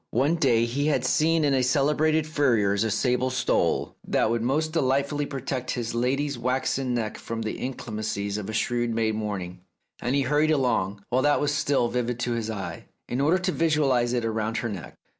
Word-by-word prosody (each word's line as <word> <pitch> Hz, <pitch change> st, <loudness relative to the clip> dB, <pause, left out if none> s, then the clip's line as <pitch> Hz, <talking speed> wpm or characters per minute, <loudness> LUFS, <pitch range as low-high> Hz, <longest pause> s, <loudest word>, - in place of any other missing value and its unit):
One 135 Hz, +7 st, +2 dB
day 120 Hz, -7 st, +3 dB
he 140 Hz, +5 st, -1 dB
had 135 Hz, -4 st, +1 dB
seen 160 Hz, +4 st, +2 dB
in 140 Hz, -, +2 dB
a 130 Hz, -, +3 dB
celebrated 150 Hz, +4 st, +2 dB
furrier's 115 Hz, -10 st, +2 dB
a 110 Hz, -, 0 dB
sable 125 Hz, +3 st, +1 dB
stole 130 Hz, 0 st, 0 dB
that 110 Hz, -, +2 dB
would 115 Hz, -1 st, 0 dB
most 155 Hz, +6 st, 0 dB
delightfully 140 Hz, 0 st, +1 dB
protect 130 Hz, -2 st, -4 dB
his 115 Hz, -2 st, -2 dB
lady's 135 Hz, +3 st, 0 dB
waxen 130 Hz, +1 st, 0 dB
neck 110 Hz, -3 st, -3 dB
from 115 Hz, -1 st, -4 dB
the 110 Hz, -, -4 dB
inclemencies 110 Hz, -5 st, -3 dB
of 105 Hz, 0 st, -6 dB
a -, -, -4 dB
shrewd 120 Hz, +1 st, 0 dB
May 110 Hz, -1 st, +1 dB
morning, 100 Hz, -5 st, -4 dB, 0.4 s
and 125 Hz, +3 st, 0 dB
he 140 Hz, -, +2 dB
hurried 150 Hz, +4 st, +2 dB
along, 110 Hz, -9 st, 0 dB
while 130 Hz, +2 st, +2 dB
that 145 Hz, +2 st, +3 dB
was 145 Hz, 0 st, 0 dB
still 140 Hz, -3 st, +1 dB
vivid 125 Hz, 0 st, -2 dB
to 120 Hz, -, -1 dB
his 115 Hz, -2 st, -2 dB
eye, 105 Hz, -3 st, -5 dB, 0.2 s
in 125 Hz, +3 st, -1 dB
order 155 Hz, +6 st, +3 dB
to 185 Hz, 0 st, -1 dB
visualize 140 Hz, -8 st, +2 dB
it 120 Hz, -2 st, 0 dB
round 110 Hz, 0 st, -1 dB
her 120 Hz, -, -2 dB
neck. 100 Hz, -5 st, -7 dB
125 Hz, 195 wpm, -26 LUFS, 115-145 Hz, 0.4 s, day